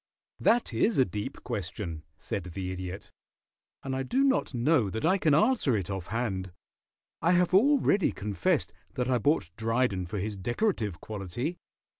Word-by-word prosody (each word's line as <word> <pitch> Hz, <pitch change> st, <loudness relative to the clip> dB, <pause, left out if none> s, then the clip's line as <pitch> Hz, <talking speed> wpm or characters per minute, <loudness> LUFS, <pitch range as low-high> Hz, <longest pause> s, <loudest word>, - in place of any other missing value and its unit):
"That 235 Hz, +1 st, +2 dB
is 225 Hz, -, +2 dB
a 130 Hz, -, +5 dB
deep 105 Hz, +3 st, -5 dB
question," 90 Hz, -4 st, -4 dB, 0.2 s
said 95 Hz, +3 st, -4 dB
the 90 Hz, +1 st, -4 dB
Idiot, 95 Hz, +2 st, -6 dB, 0.7 s
"and 135 Hz, -1 st, -3 dB
I 135 Hz, -, -1 dB
do 255 Hz, -, +1 dB
not 270 Hz, -1 st, +2 dB
know 125 Hz, -2 st, +2 dB
that 110 Hz, +8 st, -3 dB
I 190 Hz, +4 st, +3 dB
can 155 Hz, -5 st, +4 dB
answer 165 Hz, -, +3 dB
it 100 Hz, 0 st, -3 dB
off 95 Hz, -3 st, -4 dB
hand. 100 Hz, -5 st, -2 dB, 0.7 s
I 170 Hz, +3 st, +4 dB
have 180 Hz, 0 st, +3 dB
already 225 Hz, -, +4 dB
confessed 120 Hz, -, -1 dB, 0.2 s
that 125 Hz, 0 st, 0 dB
I 125 Hz, -, +3 dB
bought 140 Hz, -, +1 dB
Dryden 115 Hz, -5 st, 0 dB
for 105 Hz, -, -4 dB
his 100 Hz, +1 st, -3 dB
decorative 110 Hz, -, -1 dB
quality. 110 Hz, -, -4 dB
115 Hz, 160 wpm, -29 LUFS, -, 0.7 s, a